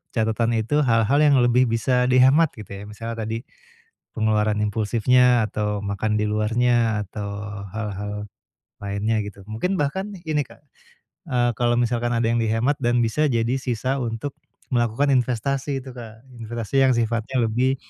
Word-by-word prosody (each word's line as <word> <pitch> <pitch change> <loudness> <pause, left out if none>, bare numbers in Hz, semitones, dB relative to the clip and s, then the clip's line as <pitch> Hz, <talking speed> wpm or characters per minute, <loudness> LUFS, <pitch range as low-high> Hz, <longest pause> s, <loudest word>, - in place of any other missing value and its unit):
catatan 115 +1 +1
itu 115 +7 +1
hal-hal 115 +3 +3
yang 150 -2 +5
lebih 120 +1 +4
bisa 125 +2 +1
dihemat 130 +6 +5
gitu 105 -3 -11
ya. 100 0 -7
Misalnya 115 +1 -6
tadi 115 +3 -4 0.7
pengeluaran 105 -1 +1
impulsifnya 115 +3 +3
atau 105 0 -2
makan 100 +1 -1
di 105 - 0
luarnya 115 +1 +1
atau 100 -1 -5 0.4
hal-hal 105 -1 -5 0.5
lainnya 100 +2 -1
gitu. 100 -1 -10
Mungkin 180 - -1
bahkan 190 +8 -2
ini 155 -3 0
Kak, - - -18 0.7
eee, 120 -2 +2
kalau 120 0 +2
misalkan 120 0 0
ada 115 - +1
yang 115 0 +1
dihemat 115 +5 +1
dan 120 -1 +2
bisa 150 +7 +1
jadi 115 0 0
sisa 130 +2 -2
untuk 120 +3 -3 0.4
melakukan 120 +3 +1
investasi 135 +2 0
itu 130 - -9
Kak. 115 -1 -11 0.2
Investasi 115 +2 -4
yang 130 - +4
sifatnya 115 +2 -1
lebih, 125 +4 +1
115 Hz, 150 wpm, -23 LUFS, 110-125 Hz, 0.7 s, yang